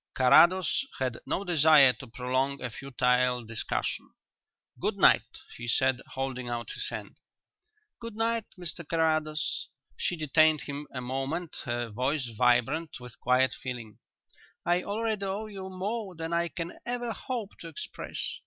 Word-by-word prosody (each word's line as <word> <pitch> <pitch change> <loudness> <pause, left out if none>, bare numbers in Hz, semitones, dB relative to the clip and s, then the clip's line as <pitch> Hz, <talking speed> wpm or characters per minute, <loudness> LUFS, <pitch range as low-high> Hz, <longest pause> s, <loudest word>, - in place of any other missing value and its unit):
Carrados 175 - +5
had 130 -3 -2
no 195 - -1
desire 155 -6 +6
to - - -11
prolong 130 +3 -1
a 125 -2 -4
futile 125 -1 +1
discussion. 115 0 -3 0.6
"Good - - -1
night," - - +4 0.2
he 120 - -6
said, 130 +2 +2
holding 130 -2 -3
out 120 -1 -3
his - - -4
hand. - - -7 0.8
"Good 230 -2 -7
night, 230 0 0
Mr 175 -3 -5
Carrados." 155 -1 0 0.3
She 180 - 0
detained 155 0 +4
him 145 +1 -6
a 125 - -4
moment, 135 +7 -3
her 120 -1 -2
voice 130 +6 0
vibrant 125 +6 +2
with 125 -1 -11
quiet 125 0 +3
feeling. 120 -5 -7 0.7
"I 175 +1 +3
already 215 +1 -2
owe 195 +3 -2
you 195 -3 -7
more 195 +1 -3
than 165 +1 -4
I 170 0 +2
can 170 0 -6
ever 240 -1 -2
hope 230 -3 -5
to 170 - -8
express. 160 - -5
150 Hz, 145 wpm, -29 LUFS, 125-180 Hz, 0.8 s, desire